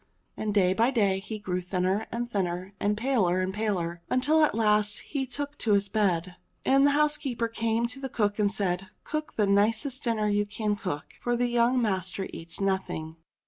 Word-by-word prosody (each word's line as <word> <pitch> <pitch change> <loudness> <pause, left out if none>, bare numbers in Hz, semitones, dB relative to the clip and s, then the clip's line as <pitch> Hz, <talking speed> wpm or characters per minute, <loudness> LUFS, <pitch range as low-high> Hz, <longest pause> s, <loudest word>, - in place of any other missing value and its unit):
And 215 - -2
day 190 -3 +3
by 230 +5 +3
day 200 -7 +2
he 210 +2 -6
grew 185 -3 -3
thinner 185 +4 -1
and 240 +1 -2
thinner, 185 -3 -2
and 210 +1 +1
paler 215 -7 +2
and 185 +1 -1
paler, 180 -5 -2
until 300 +5 +3
at 300 - +2
last 210 -1 +3
he 270 -3 -3
took 285 +3 -5
to 215 - +2
his 200 0 +2
bed. 185 -4 0 0.3
And 275 +1 +5
the 285 0 +3
housekeeper 295 -6 +1
came 230 0 0
to 250 +3 -5
the 270 -1 -4
cook 205 -3 0
and 205 -1 +3
said, 195 -2 -1 0.2
"Cook 305 0 -4
the 210 - +2
nicest 220 +7 +1
dinner 220 -3 +1
you 205 0 +1
can 210 0 -1
cook, 165 -8 -5
for 240 0 0
young 240 +1 +3
master 190 -3 -1
eats 165 +1 -5
nothing." 190 -5 -2
210 Hz, 185 wpm, -27 LUFS, 190-240 Hz, 0.3 s, And